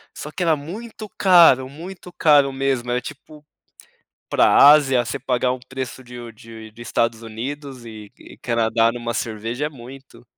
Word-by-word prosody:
só 150 - -7
que 180 - -4
era 165 -2 +3
muito 215 +8 -9
caro, 170 -9 +5
muito 175 +5 -11
caro 145 -3 +4
mesmo 135 -3 -2
era, 125 - 0
tipo, 150 +2 -12 0.9
pra - - +3
Ásia 140 -4 +6
você 115 - -4
pagar 125 -1 -1
um 130 - -6
preço 130 -1 -7
de 125 0 -11
u 120 -1 -9
de 110 0 -13
de 115 +2 -13
Estados 115 -1 -1
Unidos 130 +3 -7
e 110 -3 -11
e - - -15
Canadá 115 -1 +1
numa 120 -1 -5
cerveja 115 +6 -4
é - - -2
muito. 135 -1 -14
130 Hz, 170 wpm, -21 LUFS, 115-145 Hz, 0.9 s, Ásia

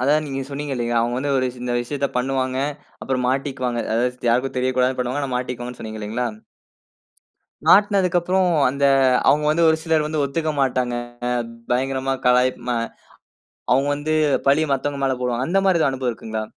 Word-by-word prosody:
அதா 140 +3 +4
நீங்க 135 -1 -4
சொன்னீங்க 140 0 -4
இல்லயா! 120 -1 -1
அவுங்க 120 +1 -1
வந்து 140 +1 -1
ஒரு 130 - +1 0.2
இந்த 120 -1 -2
விஷயத்த 140 +3 -2
பண்ணுவாங்க, 130 0 -1 0.4
அப்புறம் 130 -1 -1
மாட்டிக்குவாங்க. 130 -3 -1
அதாவது 125 +1 -1
யாருக்கும் 130 +2 0
தெரியக்கூடாதுன்னு 130 0 +1
பண்ணுவாங்க. 125 +3 -2
ஆனா, 130 -2 -3
மாட்டிக்குவாங்கன்னு 125 -1 -5
சொன்னீங்க 110 0 -6
இல்லேங்களா! 110 +4 -2 1.4
மாட்னதுக்கு 195 -3 +5
அப்புறம் 185 +1 +1 0.2
அந்த 140 +2 -1 0.4
அவுங்க 150 +1 +4
வந்து 165 +2 +3
ஒரு 160 - +2
சிலர் 160 -2 +1
வந்து 155 -1 -1
ஒத்துக்க 155 +3 -1
மாட்டாங்க. 125 -2 0 0.8
பயங்கரமா 135 +1 0
கலாய்ப் 125 +1 +3 0.2
அ - - -1 1.0
அவுங்க 135 +2 +2
வந்து 150 +2 -2 0.3
பலிய 155 +3 +4
மத்தவங்க 140 +1 -2
மேல 135 - +2
போடுவாங்க. 125 0 -1
அந்தமாரி 190 -1 +3
எதா - - +3
அனுபவம் 130 -2 -2
இருக்குங்களா? 110 -1 -5
130 Hz, 155 wpm, -21 LUFS, 125-145 Hz, 1.4 s, மாட்னதுக்கு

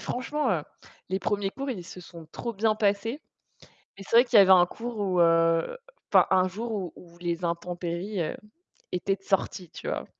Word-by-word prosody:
franchement, 280 +2 -2
heu, 160 -4 -1 0.5
les 190 +2 -1
premiers 200 +1 -1
cours, 275 +5 -5
ils 190 -8 -5
se 180 - -10
sont 170 -2 -12
trop 235 - -4
bien 215 +1 +1
passés. 215 +6 0 0.8
Et 195 - -10
c'est 230 - +1
vrai 240 - +8
qu'il 235 -3 +4
y - - +10
avait 190 - +3
un 180 -2 +8
cours 230 +3 -7
où, 185 -3 +1
heu, 165 - +3 0.3
enfin, - - +6
un 185 0 +4
jour 225 +5 -5
où 190 -5 -3
où 170 -1 -16
les 175 0 -3
intempéries, 175 +3 -3
heu, 155 - -3 0.6
étaient 195 +2 0
de 195 - -31
sorties, 190 -3 -1
tu - - -8
vois? - - -2
190 Hz, 200 wpm, -27 LUFS, 175-220 Hz, 0.8 s, y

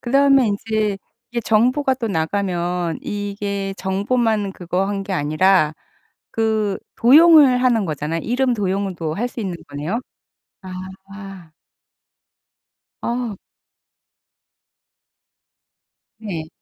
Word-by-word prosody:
그다음에 275 0 +4
인제 210 0 -1 0.3
이게 240 0 -2
정보가 250 +5 +2
또 245 -3 -3
나가면 175 -1 -1
이게 200 -1 -3
정보만 205 +1 0
그거 180 +1 -2
한 200 -1 -2
게 195 - -5
아니라 155 +1 +3 0.6
그 220 -3 0 0.2
도용을 285 -1 +7
하는 240 -5 +3
거잖아요. 155 +2 -3
이름 250 +2 +1
도용도 190 -6 -2
할 235 +7 -2
수 240 - -7
있는 190 -5 -3
거네요? 150 - -3 0.6
아. 190 -1 -10 1.5
아. 235 -4 -3 2.8
네. 175 -8 -6
200 Hz, 190 characters per minute, -20 LUFS, 185-235 Hz, 2.8 s, 도용을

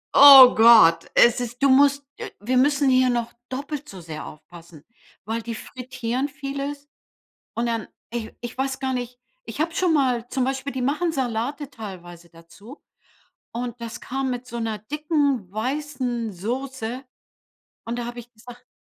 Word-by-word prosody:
Oh 270 -3 +10
Gott, 220 -8 +6
es 240 0 +5
ist 245 +2 -5
du 275 - +5
musst 280 +1 +4
äh, - - -6
wir 250 +5 -1
müssen 280 +1 +3
hier 255 -1 +4
noch 235 -1 -2 0.2
doppelt 285 +3 -6
so 190 - -10
sehr 160 -2 -8
aufpassen, 165 0 -14 0.4
weil 225 +1 -3
die 230 0 -6
frittieren 255 +2 -4
vieles 280 0 -6 0.7
und 235 +1 -1
dann 230 -3 -3 0.2
ich 230 0 -6
ich 240 +1 -7
weiß 265 0 -2
gar 260 -1 -2
nicht 245 0 -5 0.3
ich - - -8
habe 330 +1 -1
schon 360 -2 +1
mal 250 -5 +1
zum 260 -2 -1
Beispiel, 270 +1 -3
die 260 - -4
machen 310 +6 0
Salate 265 +3 -3
teilweise 175 -6 -10
dazu. 185 - -15 0.7
Und 240 0 -5
das 235 +1 -7
kam 265 0 -3
mit 250 0 -5
so 235 -1 -6
'ner 220 -2 -3
dicken 285 - -1
weißen 250 -2 -3
Soße. 250 +4 -5 0.8
Und 235 +1 -3
da 240 - -3
habe 240 0 -7
ich 240 +1 -16
gesagt:„“ 245 +3 -14
250 Hz, 165 wpm, -23 LUFS, 225-275 Hz, 0.8 s, Oh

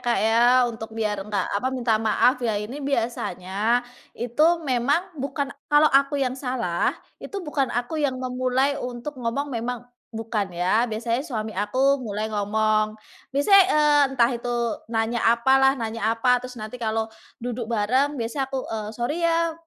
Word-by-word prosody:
Kak, 240 -1 0
ya, 225 +2 +4 0.2
untuk 225 -2 -5
biar 210 -2 -1
enggak 200 -1 -2
apa 205 +6 0
minta 235 -4 0
maaf 245 +3 +2
ya 225 -4 0
ini 225 +8 -5
biasanya, 230 -3 -1 0.3
itu 245 +6 +1 0.2
memang 285 +9 0
bukan 280 0 -3 0.2
kalau 295 +1 +5
aku 275 +1 +3
yang 265 -2 0
salah, 250 -10 -1 0.2
itu - - -7
bukan 285 -4 0
aku 245 +6 -2
yang 275 -3 0
memulai 255 +2 0
untuk 250 +2 -6
ngomong 275 +5 -2
memang 240 +1 -3 0.3
bukan 220 -3 -2
ya 200 +7 +1
biasanya 230 +3 -1
suami 220 -7 -4
aku 260 +8 +1
mulai 215 -2 -3
ngomong. 215 +1 +1 0.4
Misalnya 285 +8 +1 0.2
e 305 - +2 0.3
entah 250 -3 +2
itu 240 +1 -4 0.4
nanya 225 +1 -1
apa 250 +3 +4
lah 270 0 +5
nanya 225 -2 -2
apa 250 +2 +2
terus 250 0 -9
nanti 215 +3 -7
kalau 220 -1 0 0.4
duduk 240 -1 -4
bareng 255 +6 +1
biasa 260 +3 -2
aku 265 -1 -3
e 225 - -4 0.2
sorry 290 +8 -2
ya, 335 0 +2
240 Hz, 160 wpm, -24 LUFS, 220-270 Hz, 0.4 s, kalau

